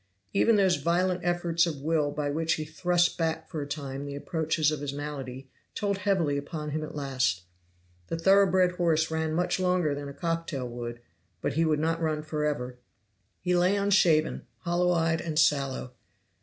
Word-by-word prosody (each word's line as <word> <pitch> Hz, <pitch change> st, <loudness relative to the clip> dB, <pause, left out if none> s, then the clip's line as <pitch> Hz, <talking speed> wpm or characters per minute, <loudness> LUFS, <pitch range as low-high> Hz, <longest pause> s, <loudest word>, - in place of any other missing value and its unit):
Even 230 Hz, -, +4 dB
those 190 Hz, -3 st, +3 dB
violent 180 Hz, +2 st, +1 dB
efforts 175 Hz, -1 st, +1 dB
of 145 Hz, -4 st, -5 dB
will 155 Hz, -2 st, +1 dB
by 145 Hz, 0 st, -2 dB
which 160 Hz, +2 st, +1 dB
he 155 Hz, -, -3 dB
thrust 175 Hz, +3 st, +1 dB
back 160 Hz, -1 st, -1 dB
for 155 Hz, -, -5 dB
a 145 Hz, -, -5 dB
time 140 Hz, -2 st, -5 dB
the 140 Hz, 0 st, -6 dB
approaches 160 Hz, 0 st, 0 dB
of 155 Hz, -, -3 dB
his 145 Hz, -1 st, -3 dB
malady 135 Hz, -3 st, -6 dB, 0.3 s
told 200 Hz, -1 st, -1 dB
heavily 185 Hz, -7 st, +1 dB
upon 150 Hz, +1 st, -5 dB
him 155 Hz, +1 st, -2 dB
at 155 Hz, -, -7 dB
last. 130 Hz, -10 st, 0 dB, 0.6 s
The 165 Hz, -, -3 dB
thorough 195 Hz, +3 st, +5 dB
bred 185 Hz, -1 st, +3 dB
horse 160 Hz, -3 st, +2 dB
ran 160 Hz, 0 st, -1 dB
much 180 Hz, +2 st, 0 dB
longer 180 Hz, -5 st, +2 dB
than 140 Hz, 0 st, -5 dB
a -, -, -8 dB
cocktail 165 Hz, -5 st, -2 dB
would, 120 Hz, 0 st, -6 dB, 0.4 s
but -, -, -2 dB
he 165 Hz, +3 st, +2 dB
could 155 Hz, -1 st, +2 dB
not 165 Hz, +2 st, 0 dB
run 155 Hz, -1 st, -1 dB
forever. 150 Hz, -5 st, -2 dB, 0.6 s
He 180 Hz, 0 st, +1 dB
lay 180 Hz, +3 st, +3 dB
unshaven, 190 Hz, -6 st, +2 dB
hollow 175 Hz, 0 st, +1 dB
eyed 165 Hz, -1 st, +1 dB
and 160 Hz, -2 st, -4 dB
sallow. 140 Hz, -4 st, +1 dB
160 Hz, 180 wpm, -28 LUFS, 145-175 Hz, 0.6 s, thorough